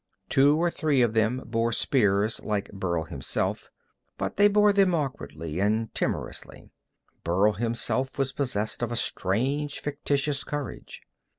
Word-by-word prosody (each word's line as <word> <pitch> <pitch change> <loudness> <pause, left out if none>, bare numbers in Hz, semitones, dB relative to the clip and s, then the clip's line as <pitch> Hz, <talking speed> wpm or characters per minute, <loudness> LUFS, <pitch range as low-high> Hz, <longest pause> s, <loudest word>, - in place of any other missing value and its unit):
Two 145 +3 +5
or 170 +1 +1
three 145 -6 +2
of 115 -2 +1
them 115 +3 +1
bore 115 0 0
spears 105 -3 +2
like 105 -2 -2
Burl 90 -4 -2
himself, 80 -5 -3 0.5
but - - -3
they 205 +1 +6
bore 205 0 +4
them 195 -3 +4
awkwardly 85 - -4
and 110 +3 0
timorously. - - -4 0.5
Burl 95 +6 +3
himself 120 +4 -1
was 135 -1 0
possessed 110 -6 -2
by 120 - -1
a - - -2
strange, 135 +10 -1
fictitious 140 -1 -1
courage. 145 -4 -6
120 Hz, 135 wpm, -27 LUFS, 105-145 Hz, 0.5 s, they